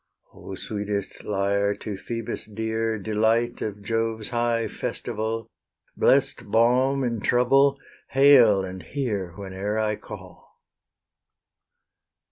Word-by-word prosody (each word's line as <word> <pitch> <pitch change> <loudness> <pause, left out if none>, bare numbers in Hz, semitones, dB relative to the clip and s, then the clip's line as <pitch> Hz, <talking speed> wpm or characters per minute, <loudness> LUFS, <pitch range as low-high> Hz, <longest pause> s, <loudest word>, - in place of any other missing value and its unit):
O 95 - -9
sweetest 100 -1 -4
lyre, 100 0 +1
to 105 -2 -6
Phoebus 115 +3 -5
dear, 110 +1 -2
Delight 110 +3 0
of 105 -1 -4
Jove's 115 0 -1
high 120 -1 0
festival, 110 +1 -3 0.5
Blest - - +2
balm 125 +5 +3
in 115 -2 -1
trouble, 135 +5 +3 0.3
hail 125 -8 +6
and 95 0 -7
hear 100 - -3
Whene'er 100 +2 -4
I 105 -1 0
call! 95 -5 -12
110 Hz, 100 wpm, -25 LUFS, 100-120 Hz, 0.5 s, hail